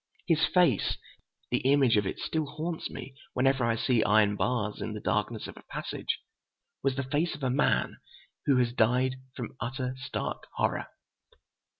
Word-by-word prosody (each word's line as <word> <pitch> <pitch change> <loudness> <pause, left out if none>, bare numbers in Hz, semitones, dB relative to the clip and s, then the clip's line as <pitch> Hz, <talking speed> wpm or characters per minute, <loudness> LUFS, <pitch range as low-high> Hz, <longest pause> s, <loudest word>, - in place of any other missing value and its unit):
His 160 -2 +3
face—the 175 - 0
image 135 -3 +4
of 105 -2 +2
it - - -3
still 160 -2 -1
haunts 160 +3 -4
me 135 - -8 0.2
whenever 130 0 +3
I 115 -1 +2
see 115 0 +2
iron 105 -1 +4
bars 105 -2 -1
in 110 - -3
the - - -4
darkness 105 +2 -1
of - - -8
a - - -12
passage—was 135 -1 -5
the 140 - -1
face 150 +6 0
of 150 - -10
a 130 - +2
man 140 +3 +2 0.5
who 140 -3 +5
has 120 -1 +2
died 125 +3 +3 0.2
from 120 -1 -6
utter, 130 +1 -2
stark 125 - -4
horror. - - 0
130 Hz, 160 wpm, -29 LUFS, 115-140 Hz, 0.5 s, who